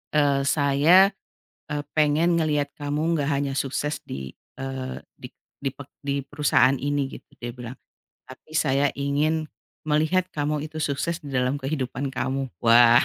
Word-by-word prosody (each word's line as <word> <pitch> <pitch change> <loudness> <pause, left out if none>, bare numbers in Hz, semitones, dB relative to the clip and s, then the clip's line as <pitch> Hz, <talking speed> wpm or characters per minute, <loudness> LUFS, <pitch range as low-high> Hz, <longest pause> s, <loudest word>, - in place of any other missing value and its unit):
Eee, 140 -2 +3
"Saya, 150 +7 +5 0.6
eee, 145 -1 -1
pengen 155 +3 +3
ngelihat 150 -3 0
kamu 150 +3 -1
enggak 145 -2 0
hanya 140 -1 0
sukses 140 +2 -2
di, 65 -1 -7 0.2
eee, 135 -1 -4 0.2
di - - -10 0.3
di 135 - 0
pek 140 +1 -11 0.2
di 140 0 -1
perusahaan 145 -2 +3
ini", 145 +1 -1
gitu, - - -13
dia 120 - -5
bilang. 125 0 -8 0.5
"Tapi 130 +4 -14
saya 145 -2 +3
ingin 150 +3 0 0.3
melihat 155 +5 +1
kamu 150 0 -1
itu 160 - -7
sukses 155 +3 -1
di 145 -4 -10
dalam 125 +2 +1
kehidupan 135 -1 -3
kamu". 135 +1 -1 0.2
Wah, 120 +1 +7
145 Hz, 145 wpm, -25 LUFS, 135-150 Hz, 0.6 s, Wah